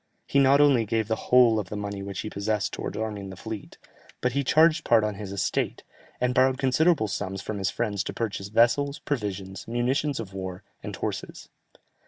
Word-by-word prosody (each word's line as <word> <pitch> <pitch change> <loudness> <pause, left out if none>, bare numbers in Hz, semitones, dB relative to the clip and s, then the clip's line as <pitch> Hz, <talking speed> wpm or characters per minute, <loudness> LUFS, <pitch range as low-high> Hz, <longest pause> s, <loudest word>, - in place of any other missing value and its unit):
He 140 - +2
not 140 +1 +5
only 140 -5 +5
gave 110 0 -1
the 110 - +1
whole 120 -3 +6
of 95 -5 -5
the - - -5
money 100 -1 -4
which 100 -1 -5
he 110 - -5
possessed 105 +1 -1
towards - - -4
arming 105 -3 -4
the 95 - -8
fleet, 110 +2 -8 0.4
but 125 - 0
he 140 +3 0
charged 160 +4 +4
part 115 -2 +4
on 105 0 0
his 100 -1 -7
estate, 100 -1 -1 0.4
and 125 0 +1
borrowed 130 0 +3
considerable 135 0 +3
sums 95 -1 -3
from 100 +2 -5
his 95 0 0
friends 105 -5 -2
to - - -3
purchase 105 -4 -3
vessels, 120 +7 +3
provisions, 100 -7 -4
munitions 125 +4 0
of 100 -4 -6
war, 95 -1 -6 0.2
and - - -6
horses. - - -5
110 Hz, 195 wpm, -26 LUFS, 100-130 Hz, 0.4 s, whole